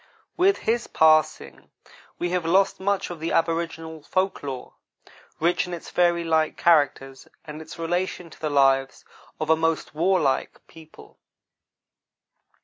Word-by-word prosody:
With 380 +3 +3
his 235 +1 -1
passing 155 -1 +2 0.5
we 175 0 -2
have 180 -1 0
lost 190 +4 +2
much 195 -1 -1
of 170 - -8
the 165 +1 -3
aboriginal 165 -1 -2
folk 185 +5 -1
lore, 135 -3 -7 0.7
rich 170 +2 +1
in 180 - -4
its 170 - -11
fairy 175 -1 +2
like 160 -1 0
characters, 140 -5 +1 0.2
and 150 0 -8
its 160 - -11
relation 175 0 -3
to - - -15
the 155 - -1
lives 135 -1 +2 0.3
of 155 0 0
a - - +6
most 165 -1 -1
warlike 165 -4 0
people. 160 -1 -17
165 Hz, 140 wpm, -24 LUFS, 155-175 Hz, 0.7 s, a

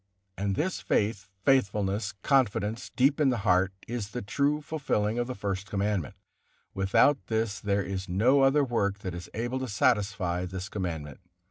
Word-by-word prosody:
And 100 0 -1
this 180 - -1
faith, 100 -3 0 0.2
faithfulness, 105 -5 +2
confidence 115 -5 +1
deep 140 +4 +2
in 140 - +5
the 125 - +1
heart, 95 0 +3 0.2
is 115 -4 -4
the 120 +2 -5
true 140 +8 +1
fulfilling 135 -8 -1
of 120 - -1
the 130 - -4
First 100 -1 -3
Commandment; 100 -5 -1 0.6
without 95 +9 +3
this 110 -2 -1
there 100 -1 0
is 95 0 -4
no 120 +10 +4
other 135 +2 +4
work 100 -6 0
that 90 - -3
is 90 0 -7
able 120 +4 -2
to 130 - -3
satisfy 100 -5 +1
this 95 +1 -6
Commandment. 80 -8 -4
105 Hz, 160 wpm, -28 LUFS, 95-125 Hz, 0.6 s, in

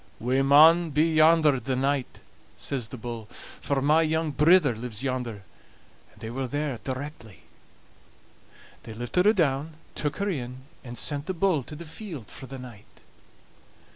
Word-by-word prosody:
"We 125 +4 +1
maun 160 +5 +6
be 155 +3 +2
yonder 155 -3 +5
the 130 +2 -2
night," 135 0 -1 0.4
says 130 -5 -2
the 120 - -9
bull, 115 -2 -7
"for 135 +2 -4
my 155 +3 +4
young 160 0 0
brither 150 -3 +4
lives 115 0 -6
yonder"; 125 -6 -3 0.7
and - - -22
they 110 - -6
were 130 +2 -3
there 145 -2 -3
directly. 130 - -7 1.4
They 110 - -10
lifted 120 - +1
her 215 - +6
down, 155 -4 0 0.2
took 150 -1 -3
her 200 0 -1
in, 130 -4 -6 0.2
and 120 -2 -8
sent 145 +4 -1
the 185 - -2
bull 175 -4 +2
to 150 - -10
the 170 +3 -9
field 160 - -8
for 130 - -9
the 135 - -8
night. 120 -5 -13
140 Hz, 160 wpm, -26 LUFS, 125-155 Hz, 1.4 s, maun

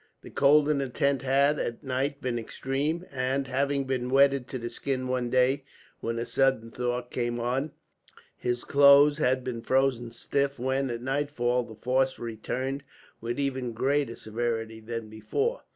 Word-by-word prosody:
The - - -11
cold 145 +1 +5
in 150 -2 +2
the 135 -1 -2
tent 140 +1 +1
had, 140 +3 +3
at 120 +5 -3
night, 135 +2 -2
been 120 -2 -1
extreme; 140 +9 -2
and, 135 +1 -1
having 140 +1 0
been 130 -2 -2
wetted 135 -1 +4
to 130 - -5
the 120 -1 -5
skin 130 +1 -3
one 125 -1 -1
day, 130 +2 +2 0.4
when 115 0 -3
a 115 - -2
sudden 130 -4 +1
thaw 125 0 -2
came 120 -1 -3
on, 130 +5 -1 0.6
his 120 0 -2
clothes 140 +1 +6
had 130 -2 +2
been 120 -2 -4
frozen 130 -1 +1
stiff 140 +4 -1
when, 130 +2 0
at 120 0 -4
nightfall, 130 -2 0
the 115 -2 -9
frost 130 +3 +1
returned 125 +4 -4 0.4
with 120 +1 -3
even 130 -4 -2
greater 135 +1 0
severity 115 0 -3
than 115 0 -5
before. 425 - -2
130 Hz, 165 wpm, -28 LUFS, 120-140 Hz, 0.6 s, clothes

